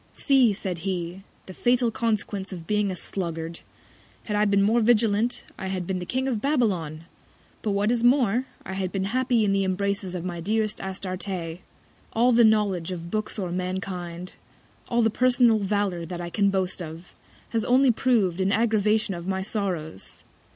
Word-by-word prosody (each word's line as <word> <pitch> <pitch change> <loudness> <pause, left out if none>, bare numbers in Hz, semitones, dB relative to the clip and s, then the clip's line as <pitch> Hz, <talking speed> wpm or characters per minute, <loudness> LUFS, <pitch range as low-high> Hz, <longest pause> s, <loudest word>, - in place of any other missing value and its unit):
See! 265 -5 +4
said 190 -4 -4
he, 180 0 -3 0.2
the 185 - -9
fatal 245 +2 +2
Consequence 210 -4 -2
of 175 -3 -7
being 210 +1 +1
a 185 - -3
Sluggard! 165 -2 -4 0.6
Had 210 - -3
I 210 0 +3
been 200 -1 +3
more 220 +4 +3
vigilant, 225 0 +2 0.2
I 190 - -4
had 185 -2 -3
been 185 0 -2
King 260 +1 -1
of 235 -6 -1
Babylon; 190 - 0 0.6
but 215 - -2
what 205 +3 +2
is 240 -1 +1
more, 245 -1 +3 0.2
I 190 - -5
had 190 -1 -2
been 195 -1 -1
happy 240 +2 +1
in 200 - +2
the 195 0 +2
Embraces 195 0 -1
of 180 -1 -4
my 175 -2 -4
dearest 215 +4 -1
Astarte. 185 -3 -4 0.5
All 240 +3 +4
the 235 0 +6
Knowledge 205 -6 +2
of 170 -1 -6
Books 215 +1 -2
or 185 -4 -3
Mankind; 180 -1 -4 0.5
all 235 -1 +2
the 225 - +3
personal 245 -1 +4
Valour 200 -3 -1
that 175 +1 -6
I 170 0 -5
can 200 +3 +2
boast 190 -1 -1
of, 165 +1 -9 0.4
has 225 -2 0
only 255 +1 +5
prov'd 215 -7 +1
an 190 +1 +2
Aggravation 215 -2 +2
of 170 0 -6
my 190 0 -1
Sorrows. 180 - -4
200 Hz, 175 wpm, -25 LUFS, 180-225 Hz, 0.6 s, the